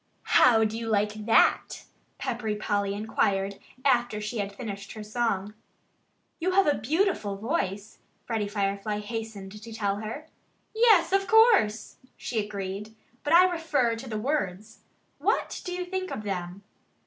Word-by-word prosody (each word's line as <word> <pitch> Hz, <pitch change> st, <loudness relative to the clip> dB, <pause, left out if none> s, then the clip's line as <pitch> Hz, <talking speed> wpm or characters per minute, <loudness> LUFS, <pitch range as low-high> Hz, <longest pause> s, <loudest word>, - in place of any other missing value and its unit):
"How 225 Hz, -3 st, +6 dB
do 220 Hz, +1 st, -1 dB
you 230 Hz, -, -5 dB
like 210 Hz, 0 st, 0 dB
that?" 225 Hz, -, +3 dB, 0.3 s
Peppery 225 Hz, -3 st, -2 dB
Polly 205 Hz, -1 st, -1 dB
inquired, 200 Hz, -2 st, 0 dB, 0.3 s
after 240 Hz, -5 st, +2 dB
she 215 Hz, +2 st, -4 dB
had 200 Hz, 0 st, -2 dB
finished 200 Hz, -2 st, -7 dB
her 215 Hz, -, -7 dB
song. 210 Hz, -2 st, -1 dB, 0.9 s
"You 365 Hz, +2 st, 0 dB
have 390 Hz, +1 st, +5 dB
a 295 Hz, -, +4 dB
beautiful 275 Hz, -, 0 dB
voice," 205 Hz, -, -3 dB, 0.3 s
Freddie 220 Hz, -3 st, -1 dB
Firefly 200 Hz, 0 st, -2 dB
hastened 210 Hz, -2 st, -6 dB
to 230 Hz, +1 st, -10 dB
tell 205 Hz, -3 st, -1 dB
her. 220 Hz, +9 st, -6 dB, 0.5 s
"Yes 435 Hz, -6 st, +5 dB
of 390 Hz, 0 st, +2 dB
course!" 445 Hz, -, +4 dB, 0.2 s
she 225 Hz, -3 st, -2 dB
agreed. 205 Hz, +1 st, -6 dB, 0.3 s
"But 295 Hz, -, +1 dB
I 350 Hz, +2 st, +9 dB
refer 315 Hz, -9 st, 0 dB
to 250 Hz, +2 st, -8 dB
the 215 Hz, -, -3 dB
words. 215 Hz, -5 st, -3 dB, 0.4 s
What -, -, 0 dB
do 360 Hz, -, -4 dB
you 360 Hz, 0 st, -3 dB
think 375 Hz, 0 st, -3 dB
of 215 Hz, -, -5 dB
them?" 185 Hz, -1 st, -4 dB
220 Hz, 150 wpm, -27 LUFS, 205-275 Hz, 0.9 s, I